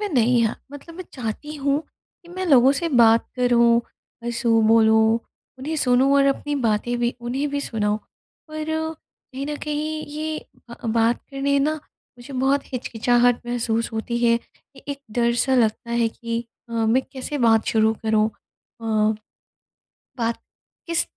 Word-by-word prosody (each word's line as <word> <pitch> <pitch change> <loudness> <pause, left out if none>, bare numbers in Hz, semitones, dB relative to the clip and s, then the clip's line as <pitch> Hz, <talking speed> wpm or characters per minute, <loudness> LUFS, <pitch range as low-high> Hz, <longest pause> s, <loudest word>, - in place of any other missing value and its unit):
में 415 - -2
नहीं 245 - +3
है। - - -2 0.2
मतलब 325 +4 -10
मैं 370 - -7
चाहती 255 +5 -5
हूँ 280 +1 +1 0.4
कि 345 - -18
मैं 370 +1 -4
लोगों 270 -3 +6
से 335 +4 -1
बात 230 -5 +5
करूँ, 235 -1 +4 0.4
हँसू, 235 -1 +1
बोलूँ, 220 0 +5 0.4
उन्हें 310 +4 -3
सुनूँ 260 0 +3
और 275 0 +4
अपनी 295 +1 -4
बातें 230 +2 +1
भी 240 0 0
उन्हें 260 +5 -2
भी 285 0 -1
सुनाऊँ। 210 -4 -1 0.5
पर 310 0 -5 0.7
कहीं 270 +2 -4
न 295 0 -3
कहीं 305 +1 -3
ये 310 +1 -4 0.3
ब 235 - -7 0.2
बात 230 +1 +3
करने 280 0 +1
न 285 +2 +2 0.5
मुझे 245 +3 -11
बहुत 270 +2 +2
हिचकिचाहट 245 0 +2
महसूस 230 -1 -1
होती 225 +2 -3
है 235 -1 +4
कि - - -22
एक 275 - -10 0.2
डर 235 -1 +2
सा 260 +2 +1
लगता 235 0 +1
है 235 -1 +2
कि 230 +1 -4 0.2
अ, - - -10
मैं 230 +3 +2
कैसे 280 +2 -4
बात 225 -3 +4
शुरू 220 0 +3
करूँ? 220 0 +3 0.5
अ, - - -9 1.3
बात 230 -1 -1 0.5
किस 335 0 +2
245 Hz, 155 wpm, -23 LUFS, 230-280 Hz, 1.3 s, लोगों